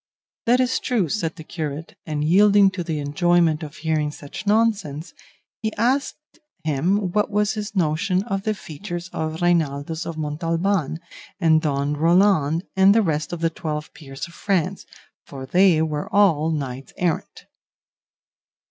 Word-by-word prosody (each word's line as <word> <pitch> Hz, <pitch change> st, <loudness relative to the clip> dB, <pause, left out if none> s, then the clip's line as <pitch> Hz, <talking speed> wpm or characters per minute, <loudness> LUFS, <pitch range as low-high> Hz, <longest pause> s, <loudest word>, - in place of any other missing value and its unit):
"That 245 Hz, +2 st, +4 dB
is 255 Hz, 0 st, +1 dB
true," 220 Hz, -, 0 dB
said 165 Hz, -5 st, -2 dB
the 160 Hz, -, -10 dB
curate, 155 Hz, -1 st, -6 dB
and 150 Hz, -1 st, -2 dB
yielding 200 Hz, +4 st, +5 dB
to 185 Hz, -2 st, -4 dB
the 160 Hz, -2 st, -3 dB
enjoyment 160 Hz, +2 st, +2 dB
of 150 Hz, -2 st, -8 dB
hearing 155 Hz, -1 st, -1 dB
such 150 Hz, +6 st, -9 dB
nonsense, 200 Hz, -8 st, +1 dB, 0.5 s
he 220 Hz, -1 st, -1 dB
asked 275 Hz, +7 st, -1 dB, 0.2 s
him 175 Hz, +6 st, 0 dB
what 210 Hz, +2 st, +1 dB
was 210 Hz, 0 st, +1 dB
his 210 Hz, -1 st, -5 dB
notion 185 Hz, +3 st, +1 dB
of 195 Hz, -3 st, -2 dB
the 215 Hz, +1 st, -1 dB
features 175 Hz, +1 st, -7 dB
of 160 Hz, +1 st, -3 dB
Reinaldos 160 Hz, -2 st, 0 dB
of 165 Hz, -, -5 dB
Montalban, 165 Hz, +2 st, -1 dB, 0.4 s
and 160 Hz, -3 st, +4 dB
Don 145 Hz, -1 st, 0 dB
Roland 165 Hz, -1 st, +3 dB
and 190 Hz, +2 st, +6 dB
the 225 Hz, -, +4 dB
rest 155 Hz, -3 st, -1 dB
of 175 Hz, -1 st, -5 dB
the 165 Hz, -1 st, +1 dB
Twelve 155 Hz, -2 st, -5 dB
Peers 135 Hz, 0 st, -8 dB
of 170 Hz, -, -16 dB
France, 190 Hz, -1 st, -1 dB, 0.4 s
for 135 Hz, -1 st, -8 dB
they 175 Hz, +1 st, +4 dB
were 150 Hz, -2 st, -3 dB
all 165 Hz, -7 st, +3 dB
knights 135 Hz, -4 st, -4 dB
errant. 175 Hz, -3 st, -2 dB
165 Hz, 150 wpm, -22 LUFS, 155-195 Hz, 0.5 s, and